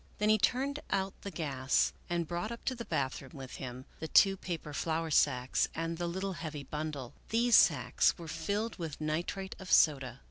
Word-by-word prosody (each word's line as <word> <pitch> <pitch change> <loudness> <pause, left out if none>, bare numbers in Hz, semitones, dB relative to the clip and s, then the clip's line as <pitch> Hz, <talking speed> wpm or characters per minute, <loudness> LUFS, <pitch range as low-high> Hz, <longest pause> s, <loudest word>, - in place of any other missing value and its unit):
Then 210 +1 +2
he 215 0 +5
turned 275 +7 +1
out 195 0 0
the 200 - -5
gas 140 -6 +1 0.2
and 170 -2 -1
brought 175 +6 -3
up 235 - -8
to 260 - +1
the 235 -2 -7
bathroom 130 0 -2
with 135 -2 -8
him 130 0 -7
the 160 - -4
two 195 +4 +6
paper 165 -5 -5
flour 160 +1 -1
sacks 130 -3 +3
and 165 +1 -3
the 175 - -1
little 190 +3 -2
heavy 155 -4 -6
bundle. 150 -3 -5 0.2
These 235 +1 +4
sacks - - +4
were 170 -2 -8
filled 200 +8 -2
with 160 -4 -5
nitrate 170 +5 -2
of 190 -2 -8
soda. 135 -4 +4
165 Hz, 185 wpm, -32 LUFS, 145-195 Hz, 0.2 s, two